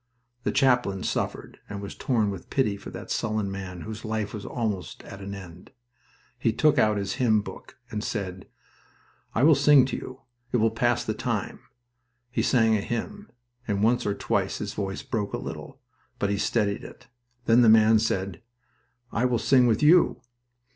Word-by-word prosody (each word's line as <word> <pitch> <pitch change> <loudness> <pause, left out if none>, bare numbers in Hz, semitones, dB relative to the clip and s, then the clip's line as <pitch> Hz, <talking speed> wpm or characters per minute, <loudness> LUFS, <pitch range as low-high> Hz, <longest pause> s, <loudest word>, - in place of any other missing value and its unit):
The - - +1
chaplain 120 -8 +2
suffered, - - -3
and 100 - -5
was 100 0 -7
torn 110 -6 0
with 95 -3 -9
pity 120 -7 +1
for 100 - -9
that - - -8
sullen 105 -3 -1
man 90 -2 -6
whose 110 +2 -7
life 110 -2 -3
was 105 -2 -6
almost 105 -6 -3
at 100 - -10
an 100 0 -6
end. 90 -2 -11 0.7
He 115 - +2
took 150 +5 +3
out 105 -1 +3
his 100 -1 -2
hymn 110 -4 +4
book 95 +4 -11
and 105 -1 -3
said: 95 -5 -4 0.9
"I 120 - +2
will 155 +2 +7
sing 140 -1 +6
to 130 - -3
you. 130 - -8 0.3
It - - +2
will 115 -1 +3
pass - - +1
the - - -1
time." - - -3 0.7
He - - 0
sang 115 -3 +3
a 105 - 0
hymn, 205 - -5 0.4
and 100 -1 0
once 120 +2 +3
or 100 - 0
twice - - -1
his - - -5
voice 100 +4 -4
broke 115 -6 -3
a - - 0
little, - - -8 0.4
but 100 - 0
he 100 - 0
steadied 100 -1 0
it. 115 - -12 0.4
Then 115 +2 +5
the 115 - +6
man 110 0 +6
said, 95 -4 -2 0.7
"I 120 - 0
will 125 -1 +2
sing 125 +1 +4
with 115 +5 +1
you." 170 +4 +5
110 Hz, 180 wpm, -26 LUFS, 100-125 Hz, 0.9 s, will